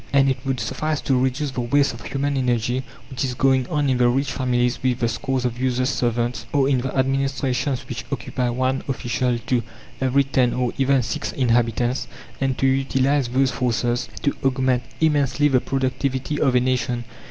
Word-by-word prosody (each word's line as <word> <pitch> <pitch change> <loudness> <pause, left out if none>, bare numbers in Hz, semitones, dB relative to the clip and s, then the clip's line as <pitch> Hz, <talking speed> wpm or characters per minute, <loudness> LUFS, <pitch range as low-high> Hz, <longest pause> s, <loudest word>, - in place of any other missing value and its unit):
And 135 -1 +4
it 130 - -3
would 135 -2 -1
suffice 150 +7 -2
to 135 - +1
reduce 130 +3 0
the 130 - -3
waste 140 +3 +2
of 115 - -10
human 140 +1 -2
energy 125 -1 0 0.3
which 130 - -2
is 125 -2 -2
going 130 -1 +2
on 145 -1 0
in 130 -2 +2
the 120 -1 +5
rich 135 +3 0
families 125 -2 0
with 130 -2 +1
the 120 -2 0
scores 125 +3 -2
of 120 0 -2
useless 130 +1 +1
servants, 120 -1 -1
or 140 -2 +3
in 135 -2 +2
the 130 +2 -3
administrations 135 0 0
which - - -5
occupy 125 -1 -2
one 130 +2 0
official 125 -2 -1
to 125 -2 +1 0.4
every 130 +1 +3
ten 130 -2 +1
or 125 -1 0
even 135 -1 +3
six - - -3
inhabitants, 120 0 +1 0.3
and 135 -1 0
to - - +1
utilize 135 0 +2
those 130 +2 +2
forces, 120 -1 -1
to 140 - +1
augment 130 -1 +2 0.2
immensely 145 -2 +2
the 130 -3 +3
productivity 135 +2 -1
of 130 -2 +3
a - - +6
nation. 125 -1 0
130 Hz, 185 wpm, -22 LUFS, 125-135 Hz, 0.4 s, a